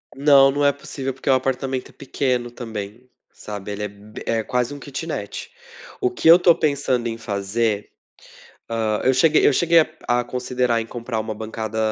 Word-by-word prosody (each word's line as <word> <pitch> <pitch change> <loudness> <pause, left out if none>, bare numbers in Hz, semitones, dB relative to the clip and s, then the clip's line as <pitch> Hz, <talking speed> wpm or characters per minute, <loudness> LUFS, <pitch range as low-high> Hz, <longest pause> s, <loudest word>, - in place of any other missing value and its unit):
Não, 140 -1 +6
não 145 +1 0
é 140 - +6
possível, 140 -2 -5
porque 135 - -5
o - - +6
apartamento 130 0 -1
é - - -16
pequeno 125 -3 -2
também, 115 0 -7 0.2
sabe? 105 -1 -7
Ele 100 +1 -4
é 105 - -1
b 105 +1 -12
é 115 -1 0
quase 125 +4 -1
um 145 - -8
kitnet. 140 - -6 0.5
O 380 - +2
que 370 - -2
eu 170 +2 +9
tô 175 -2 +5
pensando 140 -5 0
em 115 - -3
fazer, 105 0 -2 0.8
hã, 110 -2 0
eu 130 - +5
cheguei, 155 +4 +4
eu - - +4
cheguei 170 +4 +4
a 160 - +4 0.3
a 120 - 0
considerar 125 -1 -1
em 115 - -5
comprar 115 -1 -4
uma 110 0 -4
bancada 110 0 -5
125 Hz, 185 wpm, -22 LUFS, 110-140 Hz, 0.8 s, eu